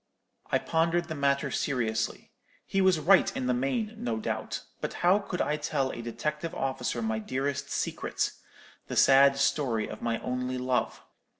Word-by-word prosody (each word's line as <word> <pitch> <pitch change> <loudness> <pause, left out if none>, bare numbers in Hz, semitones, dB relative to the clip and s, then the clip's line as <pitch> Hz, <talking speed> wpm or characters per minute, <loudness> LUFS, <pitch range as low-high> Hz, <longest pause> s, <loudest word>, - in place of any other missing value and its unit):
I - - +4
pondered 170 +1 0
the - - -2
matter 140 -1 +1
seriously. 115 -5 -1 0.3
He 195 - 0
was 190 -3 +4
right 185 +6 +5
in 130 - -2
the 125 - +2
main, 135 - -1
no 115 -2 -1
doubt; 110 - -3 0.2
but - - -3
how 185 +3 +6
could 190 -3 -4
I 150 - 0
tell 145 -3 -1
a - - -6
detective 150 +7 -3
officer 130 -3 -2
my 110 0 -1
dearest 140 +4 -2
secret—the - - -4
sad 140 +1 +6
story 135 -5 +1
of 110 - -8
my 115 -1 0
only 125 0 -2
love? 125 0 -1
140 Hz, 160 wpm, -29 LUFS, 125-155 Hz, 0.3 s, how